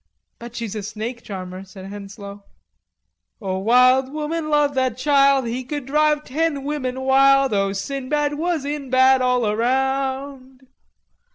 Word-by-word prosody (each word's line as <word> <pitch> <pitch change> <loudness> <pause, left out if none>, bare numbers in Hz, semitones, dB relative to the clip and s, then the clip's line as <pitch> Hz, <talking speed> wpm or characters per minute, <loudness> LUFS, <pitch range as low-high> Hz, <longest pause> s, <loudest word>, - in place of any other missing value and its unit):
"Bet 235 0 -10
she's 230 -4 -4
a 215 - -4
snake 220 +4 -6
charmer," 185 -2 -7
said 190 0 -12
Henslowe. 200 0 -9 1.0
"O, 190 -3 -3
wild 255 +5 +4
woman 305 +1 -3
loved 295 -1 +2
that 260 -3 0
child 275 -1 +3
He 240 +2 -3
would 290 -3 -4
drive 300 +2 +2
ten 295 0 -2
women 265 -3 -3
wild! 270 -1 +4
O, 195 -1 +1
Sinbad 275 +8 -2
was 320 -1 -2
in 285 -2 -4
bad 260 0 +4
all 250 -2 +1
around!" 265 +3 -2
260 Hz, 140 wpm, -21 LUFS, 225-280 Hz, 1.0 s, wild